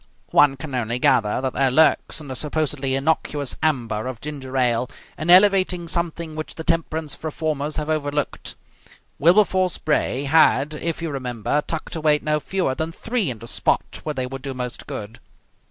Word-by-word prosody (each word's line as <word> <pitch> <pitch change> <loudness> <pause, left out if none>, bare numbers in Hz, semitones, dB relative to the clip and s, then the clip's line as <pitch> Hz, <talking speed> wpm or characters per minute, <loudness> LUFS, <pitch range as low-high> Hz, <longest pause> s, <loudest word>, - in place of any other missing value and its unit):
One 140 -2 +5
can 140 -1 -7
only 120 -1 -1
gather 115 -2 +2
that 130 -1 -2
there 135 -1 +2
lurks 160 +4 +3
in 150 - -9
the 130 - -4
supposedly 145 -2 0
innocuous 145 -1 0
amber 120 -8 0
of 130 -3 -6
ginger 135 -2 -6
ale 125 0 +1 0.3
an 155 +4 -4
elevating 185 -2 +5
something 170 -1 -2
which 155 0 -6
the 160 - -6
temperance 160 -2 -2
reformers 155 -1 -2
have 150 -1 -3
overlooked. 150 -2 -2 0.6
Wilberforce 185 +2 +4
Bray 150 -3 0
had, 145 -1 +3
if 165 +2 -4
you 165 - -2
remember, 125 +1 -2
tucked 160 0 -4
away 155 -2 +3
no 150 0 +1
fewer 180 -3 -1
than 160 +4 -3
three 225 - -1
in 120 - -4
the 115 +1 -10
spot - - 0
where 150 -1 -3
they 130 -1 -1
would 135 +1 -7
do 135 -1 -5
most 125 -1 -5
good. 105 +2 -7
150 Hz, 170 wpm, -22 LUFS, 130-160 Hz, 0.6 s, One